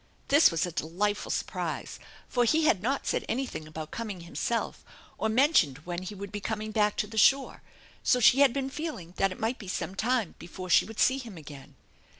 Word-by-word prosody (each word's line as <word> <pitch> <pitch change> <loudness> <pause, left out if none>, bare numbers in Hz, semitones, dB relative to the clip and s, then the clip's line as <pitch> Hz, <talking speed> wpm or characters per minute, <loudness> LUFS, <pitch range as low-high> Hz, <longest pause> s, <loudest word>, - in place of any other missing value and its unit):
This 290 +3 +7
was 165 0 0
a 175 - -5
delightful 195 +7 -2
surprise, - - -3 0.3
for 245 - +1
he 310 +7 +3
had 195 -11 +3
not 270 +6 -1
Baid - - -1
anything 245 -11 -3
about 155 0 -7
coming 210 -6 -5
himself 205 +7 -3 0.4
or 220 - 0
mentioned 220 - +3
when 175 0 -4
he 185 +3 -7
would 200 0 -7
be 205 - -5
coming 215 0 -3
back 210 -1 +1
to - - +1
the 220 +1 -3
shore, 270 +5 +3 0.4
so 250 - +3
she 245 +3 +6
had 280 -3 +6
been 270 +1 -3
feeling 280 - -6
that 195 -1 +2
It - - -8
might 230 +4 -1
be 200 - -9
some 185 - -3
time 225 -1 0
before 185 +1 -7
she - - +6
would 220 -1 -9
see 265 +1 +4
him 230 -8 -9
again. 145 -3 -11
215 Hz, 205 wpm, -28 LUFS, 180-255 Hz, 0.4 s, This